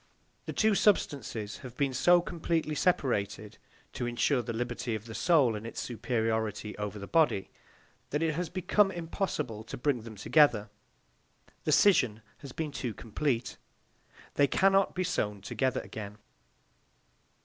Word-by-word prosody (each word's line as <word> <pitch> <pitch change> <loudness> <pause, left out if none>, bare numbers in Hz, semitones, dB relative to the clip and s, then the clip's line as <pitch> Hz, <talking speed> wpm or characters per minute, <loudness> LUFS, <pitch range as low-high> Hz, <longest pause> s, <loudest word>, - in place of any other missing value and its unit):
The - - -2
two 220 0 +3
substances 135 - +1
have 125 -1 -11
been 140 -2 0
so 175 +7 +5
completely 165 -2 -2
separated, 110 - 0 0.3
to 120 - -3
insure 120 +2 +1
the 120 0 -5
liberty 120 0 -3
of 110 0 -7
the 115 - -8
soul 140 -6 +3
and 105 - -6
its - - -6
superiority 110 -2 -2
over 105 0 -4
the 100 - -6
body, 150 -9 +2 0.6
that 150 +3 -1
it 160 -1 +1
has 175 +2 -3
become 195 +2 +2
impossible 165 - -3
to 110 - -7
bring 125 -1 0
them 110 0 -10
together. 110 -2 +3 0.9
The - - +1
scission 125 - +4 0.2
has 140 - -9
been 155 +2 -4
too 125 -6 -4
complete. 120 +1 -2 0.8
They 145 - +4
cannot 195 +4 +3
be 185 - 0
sewn 105 - -1
together 130 +5 -1
again. 105 -1 -8
125 Hz, 145 wpm, -30 LUFS, 110-160 Hz, 0.9 s, so